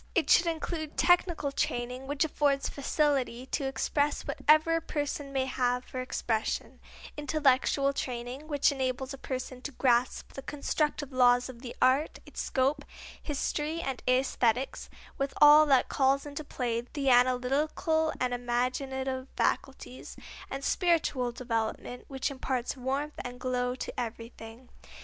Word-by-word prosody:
It 340 - +2
should 345 - +6
include 320 -1 -3
technical 345 -5 +3
training 255 -2 -2
which 285 +2 +1
affords 285 -2 +1
facility 275 -4 0
to 275 +1 -2
express 285 +2 0
whatever 310 +2 +3
a - - -3
person 290 -2 -3
may 265 -1 0
have 250 -1 0
for 255 - -5
expression; 225 -3 -2 0.4
intellectual 280 -2 +2
training 250 +3 -5
which 290 -2 +2
enables 265 0 -2
a 275 - -9
person 255 -1 -5
to 290 - -5
grasp 245 -1 +1
the 270 - -7
constructive 290 0 -2
laws 250 -1 +4
of 240 -2 -10
the 250 -2 -7
art, 265 +4 +3
its - - -6
scope, 275 +2 0 0.4
history 300 +2 -2
and 270 -6 -4
æsthetics, 255 -1 +1 0.3
with 275 0 -2
all 300 +1 +8
that 270 -3 +4
calls 275 +1 +2
into 290 +1 -6
play 240 -5 -2
the 270 +2 -1
analytic 255 +4 +3 0.5
and 250 -1 0
imaginative 260 +2 -2
faculties; 265 -1 -2 0.3
and 270 0 -5
spiritual 320 -8 +1
development 235 0 -3
which 270 +1 -2
imparts 260 -2 -2
warmth 275 +4 -2
and 245 0 -7
glow 250 0 -1
to - - -6
everything. 230 +1 -7
265 Hz, 135 wpm, -29 LUFS, 250-290 Hz, 0.5 s, all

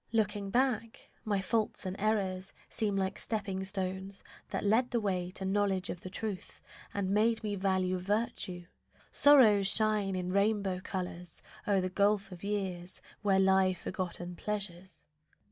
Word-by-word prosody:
Looking 210 -3 0
back, 235 -1 0
My 205 -2 0
faults 215 +1 -1
and 185 0 -3
errors 195 -3 0 0.2
seem 210 -3 -1
like 190 -1 -1
stepping 200 -4 -2
stones 190 0 -4 0.3
That - - -2
led 225 +5 +3
the 235 - +1
way 185 -4 -1
to 190 - -3
knowledge 195 -1 +1
of 175 - -7
the 185 - -7
truth 205 -1 -5 0.3
And 195 -2 -1
made 220 +2 +2
me 210 -1 -1
value 185 -1 +1
virtue; 185 -3 -2 0.5
sorrows 225 -9 +6
shine 210 -2 +2
In 180 0 -2
rainbow 200 -1 +1
colours 180 -2 -6 0.2
o'er 200 -2 +3
the 185 - -1
gulf 200 +1 +2
of 180 0 -10
years, 190 -3 -3 0.2
Where 200 -2 +3
lie 190 -1 +4
forgotten 175 0 -4
pleasures. 190 -3 -5
195 Hz, 145 wpm, -32 LUFS, 185-210 Hz, 0.5 s, sorrows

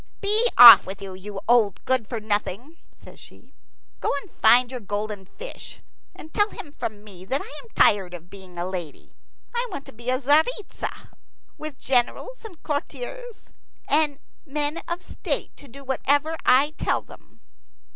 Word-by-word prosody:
"Be 425 +4 +3
off 240 -1 +11
with 190 +1 -7
you, 195 -1 -8
you 195 +2 -8
old 225 -5 +2
good 255 -4 +1
for 230 - -4
nothing!" 215 - -3
says - - -16
she. - - -18 0.5
"Go - - -1
and 390 - -18
find 245 +1 +5
your 255 - -5
golden 205 -1 -5
fish, - - -9 0.4
and 315 - -13
tell 415 0 +2
him 405 -10 -10
from 215 -7 -6
me 190 -4 -13
that 265 +8 -1
I - - -8 0.2
am 465 - -19
tired 190 -3 +3
of 175 0 -12
being 185 -2 -13
a 175 - -2
lady. 175 -5 -7 0.4
I 485 +1 -1
want 280 - -7
to - - -12
be 235 +2 -14
Tzaritza, 290 - 0 0.5
with 305 -3 -5
generals 270 - -1
and 385 -8 -12
courtiers 485 +10 -6 0.3
and 295 -1 +2 0.3
men 295 +1 -2
of 345 +1 -4
state - - -4
to 285 - -13
do 275 +3 -11
whatever 285 +4 0
I 275 +4 +5
tell - - 0
them." - - -17
260 Hz, 165 wpm, -24 LUFS, 205-315 Hz, 0.5 s, off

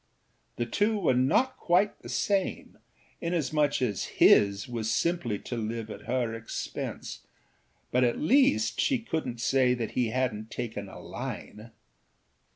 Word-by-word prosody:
The 120 - -1
two 210 - +1
were 170 -10 +2
not 140 - +2
quite 185 +4 +2
the - - -10
same, 200 -2 -1 0.4
inasmuch 150 -5 +1
as 105 -8 -1
his 100 0 +5
was 115 -3 -3
simply 125 -4 0
to 120 - -6
live 110 -1 -4
at - - -10
her 120 -2 0
expense; 115 0 -5 0.7
but 125 +1 +3
at 120 -1 +2
least 155 - +3
she 270 - +2
couldnât 160 - -4
say 125 0 +3
that 115 -3 -3
he 125 -2 +1
hadnât 110 -3 -2
taken 110 -5 -5
a - - -10
line. 110 +2 -7
125 Hz, 140 wpm, -28 LUFS, 115-170 Hz, 0.7 s, his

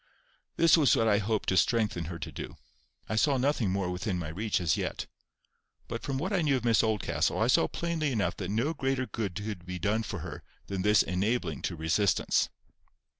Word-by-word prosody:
This 165 0 +5
was 145 -7 +5
what 115 - +2
I 105 -2 +4
hoped 110 0 -1
to 95 - +1
strengthen 105 -6 +2
her 85 +1 -6
to 80 - -6
do. - - -8 0.5
I 110 - -2
saw 135 +5 +3
nothing 130 -5 +1
more 95 -1 -1
within 90 +1 -2
my 80 -3 -4
reach 105 +6 -1
as 85 -4 +1
yet. - - -3 0.8
But - - -5
from 135 -2 -3
what 185 +9 -2
I 185 - +2
knew 140 -4 +2
of 120 - -5
Miss 115 -2 +4
Oldcastle, 110 -3 0
I - - +2
saw - - +4
plainly 165 -4 -2
enough 110 -5 0
that 95 -2 -4
no 120 +10 0
greater 135 -3 -1
good 105 -7 -4
could 105 -3 -5
be 90 +1 -5
done 105 +6 0
for - - -5
her - - -7 0.2
than 100 -2 -3
this 105 +2 +4
enabling 90 - -1
to - - -3
resistance. 80 +4 +1
110 Hz, 205 wpm, -29 LUFS, 90-130 Hz, 0.8 s, This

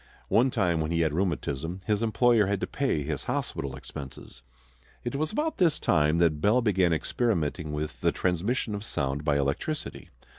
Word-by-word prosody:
One 125 +4 +4
time 85 -8 +1
when 80 - -1
he 85 0 +1
had 80 -2 +1
rheumatism 85 -1 -2
his 105 -1 +1
employer 115 -1 +3
had 100 -1 0
to - - +1
pay 130 - -1
his 75 -1 -4
hospital 70 -1 -3
expenses. 70 -2 -9 0.6
It 120 - -3
was 155 +2 -1
about 310 +7 -1
this 170 -5 +3
time 75 +2 +3
that 80 -3 +2
Bell 105 +7 +4
began 95 -7 +2
experimenting 80 - -1
with 75 -5 -4
the - - +3
transmission 100 +6 -1
of 100 0 -4
sound 70 -6 -2
by 75 -2 +2
electricity. 70 - -3
85 Hz, 175 wpm, -28 LUFS, 75-115 Hz, 0.6 s, One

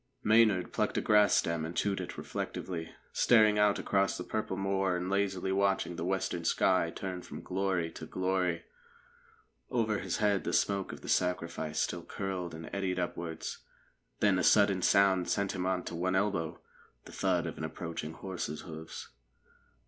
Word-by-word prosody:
Maynard 110 -4 +4
plucked - - 0
a - - +2
grass 105 -1 +5
stem 85 -1 +1
and 80 +2 -5
chewed 100 -1 0
it - - -7
reflectively, 85 -3 -4 0.2
staring 110 -3 +5
out 105 -1 +4
across 100 -1 +1
the 90 - -4
purple 105 -2 -3
moor 95 -1 +1
and 90 +2 -3
lazily 95 -1 0
watching 95 -2 +1
the 85 - -4
western 90 -2 -1
sky 90 0 +3
turn 90 +1 -5
from - - -9
glory 95 -3 -1
to - - -9
glory. 95 -2 0 1.1
Over 110 -4 +1
his - - -2
head 105 -2 +2
the 85 - -2
smoke 100 -1 +1
of - - -9
the - - -10
sacrifice 85 -3 0
still 85 - -1
curled 90 -2 -4
and 80 0 -8
eddied 95 -2 -1
upwards. 85 -2 -4 0.6
Then 100 -3 +4
a - - 0
sudden 100 0 +5
sound 95 -1 +4
sent 100 -1 +1
him 90 0 -2
on 95 -1 0
to - - -6
one 90 +2 0
elbow 85 -4 0 0.5
the - - -11
thud - - +1
of - - -5
an - - -4
approaching 80 -1 -5
horse's 90 -5 -5
hoofs. 80 -1 -8
95 Hz, 170 wpm, -31 LUFS, 85-100 Hz, 1.1 s, grass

